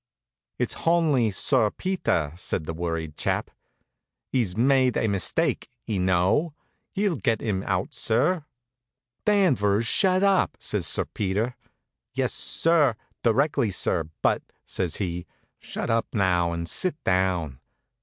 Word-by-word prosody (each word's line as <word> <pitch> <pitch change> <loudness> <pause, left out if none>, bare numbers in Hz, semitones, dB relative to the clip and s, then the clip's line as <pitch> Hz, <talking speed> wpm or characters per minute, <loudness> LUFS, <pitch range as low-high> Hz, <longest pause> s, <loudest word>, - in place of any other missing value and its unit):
"It's - - -1 0.2
honly 155 -9 +3
Sir 105 +2 +2
Peter," 105 - -1
says 90 - -2
the 80 - -5
worried 80 -2 -4
chap. - - -2 0.8
"'E's 110 -7 +1
myde 130 +1 +3
a 110 - +1
mistyke, 100 -4 0 0.2
y' 105 -4 -2
know. 95 - +2 0.4
Hi'll 195 -5 +1
get 115 -3 0
'im 100 -4 -2
out, 90 -1 -1
sir." 145 +9 +1 0.8
"Danvers, 125 - +3
shut 185 - +3
up!" 195 -2 +2
says - - -2
Sir - - +1
Peter. 105 +5 -2 0.6
"Yes, - - 0
sir; 155 -7 +3 0.3
directly, 120 0 +2
sir; 85 -3 -1
but - - +2 0.2
" - - -48
says 90 -4 -2
he. 90 -3 -4 0.3
"Shut - - -4
up 115 0 +1
now 90 -5 +2
and 85 0 -4
sit 180 - +1
down!" 90 -7 0
110 Hz, 130 wpm, -25 LUFS, 90-145 Hz, 0.8 s, honly